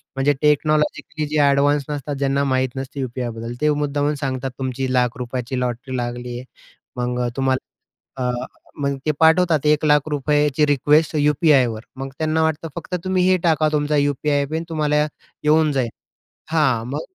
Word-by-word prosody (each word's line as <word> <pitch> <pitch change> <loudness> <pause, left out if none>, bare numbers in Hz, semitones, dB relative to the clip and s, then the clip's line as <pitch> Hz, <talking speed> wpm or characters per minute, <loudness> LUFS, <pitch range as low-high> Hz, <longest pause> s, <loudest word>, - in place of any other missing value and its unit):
म्हणजे 135 +2 +2
टेक्नॉलॉजिकली 150 +1 +1
जे 150 +1 0
एडव्हान्स 145 +1 +2
नसतात, 145 0 -4
ज्यांना 140 0 +1
माहीत 130 0 +1
नसते 135 +1 -6
यू-पी-आयबद्दल, 120 -2 -4
ते 150 - +3
मुद्दामून 145 +1 0
सांगतात 130 -1 -2
तुमची 130 0 -2
लाख 125 -2 +1
रुपयाची 125 +1 -3
लॉटरी 125 +1 -3
लागलीये, 120 0 -4 0.5
मग 125 0 -2
अ, - - 0
तुम्हाला 135 -1 0 0.5
अ, 125 - +1 0.5
मग 140 -1 0
ते 155 - +3
पाठवतात 160 -2 +4
1,00,000 150 0 +3
रुपयाची 150 0 +2
रिक्वेस्ट 150 +3 +3
यू-पी-आयवर. 145 -6 +3 0.2
मग 135 +1 -5
त्यांना 160 0 +1
वाटतं 160 0 -1
फक्त 180 - -4
तुम्ही 185 -1 +2
हे 185 - +4
टाका 155 -2 +3
तुमचा 150 0 +1
यू-पी-आय 145 0 +1
पिन 160 +1 -2
तुम्हाला 150 -1 +1 0.4
येऊन 155 0 +4
जाईल. 130 -4 0 0.6
हां, 135 -8 +2
मग 145 +3 -2
145 Hz, 150 wpm, -21 LUFS, 130-150 Hz, 0.6 s, पाठवतात